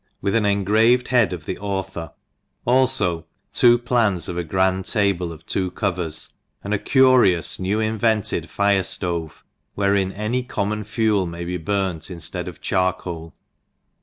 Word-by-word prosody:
WITH 100 0 -1
AN 110 -2 +2
ENGRAVED 110 +5 +3
HEAD 120 -6 +3
OF 85 -4 -6
THE - - -4
AUTHOR, 95 -4 -4 0.5
Alfo 120 -10 +2 0.3
Two 120 -1 +6
Plans 115 -7 +1
of 90 - -4
a 90 - -2
Grand 95 +2 0
Table 95 -5 0
of 80 +1 -12
Two 95 -1 -1
Covers 90 -4 -2
s - - -3 0.3
and 100 - -2
A 105 - +1
cnrioas 130 - +3
oew 95 +3 0
invented 110 -6 0
Fire 100 -1 +2
Stove, 85 -3 -1 0.3
wherein 100 -1 +1
any 105 +5 -2
common 105 -3 -3
Fael 105 -4 +1
may 85 +1 -6
be 90 +1 -3
burnt 95 -1 -2
inftead 85 -4 -4
of - - -9
Charpoal. 90 -3 -2
100 Hz, 150 wpm, -22 LUFS, 90-110 Hz, 0.5 s, Two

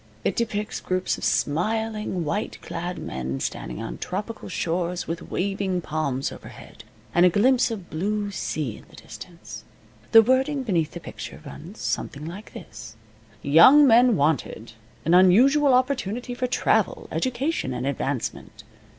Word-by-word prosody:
It - - 0
depicts 210 -3 -2
groups 185 0 -2
of - - -10
smiling, 210 +2 -1
white 205 +8 -3
clad 175 +2 -5
men 65 +1 -4
standing - - -4
on - - -6
tropical 210 +4 -5
shores, 175 +1 -2
with 165 +2 -5
waving 195 -1 -1
palms 140 -5 -2
overhead, - - -12 0.3
and 175 - +4
a 180 - +7
glimpse 250 +8 +3
of 205 -6 -7
blue 205 +5 -2
sea 150 - -3
in - - -16
the - - -16
distance. 170 -2 -11 0.5
The 225 -1 +9
wording 265 +3 +1
beneath 170 -9 0
the 175 - -6
picture - - -9
runs 165 +8 -10
something 145 +1 -3
like 185 +6 -9
this: - - -10 0.5
"Young 170 - +7
men 240 -1 +6
wanted. 140 -7 -1 0.3
An 165 - +2
unusual 255 +11 +5
opportunity 250 -2 0
for 250 +1 -2
travel, 245 - +1
education, 260 - -1
and 125 0 -3
advancement. 140 -2 -4
185 Hz, 140 wpm, -24 LUFS, 160-235 Hz, 0.5 s, The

